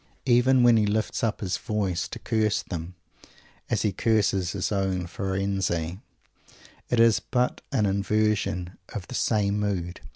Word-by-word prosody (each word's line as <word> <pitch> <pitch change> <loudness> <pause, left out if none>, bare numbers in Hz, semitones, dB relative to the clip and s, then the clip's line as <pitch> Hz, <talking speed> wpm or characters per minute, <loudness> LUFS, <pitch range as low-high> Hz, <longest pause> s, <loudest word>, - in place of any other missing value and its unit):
Even 125 0 +4
when 120 -1 +6
he 105 -1 +2
lifts 110 +3 -1
up 110 -2 0
his 95 -3 -1
voice 100 -4 -2
to - - -7
curse 110 -3 0
them, 85 0 -6 0.7
as - - 0
he 105 - +2
curses 100 -5 +1
his 95 -1 -2
own 95 -3 0
Firenze, 95 -2 -2 0.9
it 120 - +1
is 115 -1 +5
but 125 0 -1
an 105 - +2
inversion 100 -2 0 0.2
of 100 -4 -5
the - - -8
same 105 -4 +1
mood. 90 -4 -2
100 Hz, 150 wpm, -26 LUFS, 95-110 Hz, 0.9 s, when